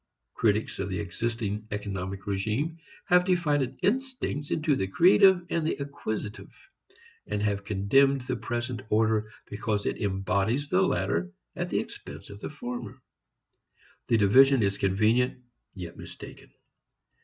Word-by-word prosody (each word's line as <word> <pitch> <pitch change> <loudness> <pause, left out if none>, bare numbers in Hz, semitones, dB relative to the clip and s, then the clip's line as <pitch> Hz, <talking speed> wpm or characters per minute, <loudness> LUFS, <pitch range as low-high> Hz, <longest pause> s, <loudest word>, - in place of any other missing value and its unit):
Critics 110 -1 0
of 95 - -2
the 95 - -2
existing 105 +2 -3
economic 100 -2 -4
regime 110 - -1 0.3
have 180 0 +5
divided 145 -8 +1
instincts 250 - -1
into 150 -2 +1
the 95 - -1
creative 180 - +5
and 165 - +1
the 155 - 0
acquisitive, 110 -7 -5 0.8
and 105 - -2
have 100 -1 0
condemned 125 +8 +3
the 125 - -3
present 120 0 -3
order 110 0 +2 0.2
because 105 0 -2
it - - -2
embodies 100 +7 0
the 185 +1 +3
latter 95 - 0 0.2
at - - -3
the - - +1
expense 75 +8 -8
of 100 - -10
the - - -5
former. 120 -6 -6 1.1
The 115 - +3
division 130 +5 +6
is 100 0 0
convenient, 110 +6 +2 0.3
yet 90 -3 -8
mistaken. - - -11
110 Hz, 130 wpm, -28 LUFS, 100-140 Hz, 1.1 s, division